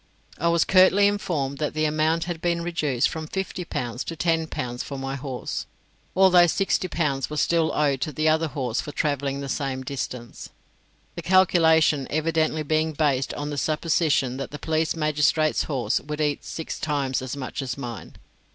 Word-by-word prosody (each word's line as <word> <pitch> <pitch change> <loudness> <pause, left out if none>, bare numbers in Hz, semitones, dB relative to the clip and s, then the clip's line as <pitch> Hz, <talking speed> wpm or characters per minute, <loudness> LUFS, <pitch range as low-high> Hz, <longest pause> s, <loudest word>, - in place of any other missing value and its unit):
I 170 - +1
was 170 -1 +4
curtly 190 +2 +5
informed 165 -9 -1
that 150 0 -2
the 155 0 +1
amount 155 +2 +1
had 175 -2 -5
been 170 -1 0
reduced 150 -7 0
from 160 -1 -5
fifty 190 0 -4
pounds 120 -6 -4
to 165 - -5
ten 165 0 0
pounds 120 -4 -4
for 140 - -6
my 135 0 -4
horse, 135 -2 -5 0.5
although 180 -2 +6
sixty 190 +1 0
pounds 140 -6 -1
was 150 0 -2
still 170 -1 +2
allowed 140 -4 0
to 155 - -1
the 155 +2 0
other 160 +1 +3
horse 130 -6 -2
for 150 - -7
travelling 140 -2 -1
the 140 - -5
same 135 -1 -2
distance, 125 -3 -6 0.6
the - - -6
calculation 160 -6 +4
evidently 155 0 0
being 155 +1 0
based 140 -3 +1
on 145 +1 -4
the 145 - -2
supposition 155 -5 +1
that 135 - -5
the 150 - -7
police 160 +1 0
magistrate's 155 0 +2
horse 135 -5 0
would 150 +1 -6
eat 150 -2 0
six 160 - -6
times 140 -4 -1
as 130 +2 -5
much 135 +1 -4
as 130 -1 -4
mine. 120 -6 -7
150 Hz, 180 wpm, -24 LUFS, 135-165 Hz, 0.6 s, although